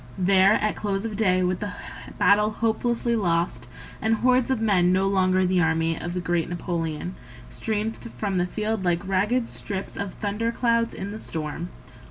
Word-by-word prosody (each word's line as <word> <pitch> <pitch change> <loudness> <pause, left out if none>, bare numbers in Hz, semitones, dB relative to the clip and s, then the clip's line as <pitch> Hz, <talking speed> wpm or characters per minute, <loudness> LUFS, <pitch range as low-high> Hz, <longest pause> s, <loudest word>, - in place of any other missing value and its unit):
— - - -18 0.2
There 190 +2 +6
at 215 -1 +1
close 200 0 -2
of 220 -2 -3
day 185 -3 +2
with 180 0 0
the 205 -1 -4 0.4
battle 205 +2 +4
hopelessly 235 +2 0
lost, 170 - 0 0.3
And 225 0 +2
hordes 250 +2 +2
of 260 -3 +1
men 190 -5 +3
no 190 +1 +2
longer 185 -1 +2
the 180 0 +2
army 165 0 +1
Of 175 +2 -5
the - - 0
great 175 -2 -1
Napoleon 170 -1 -3 0.4
Streamed 220 0 -2 0.2
from 195 -3 -1
the 175 - +1
field 215 +1 -2
like 175 0 0
ragged 210 +6 +1
strips 195 -1 -5
Of 200 -2 -4
thunder 215 +2 -1
clouds 230 -1 +1
in 195 +1 -5
the 215 - -6
storm. 160 0 -5
195 Hz, 180 wpm, -25 LUFS, 180-220 Hz, 0.4 s, There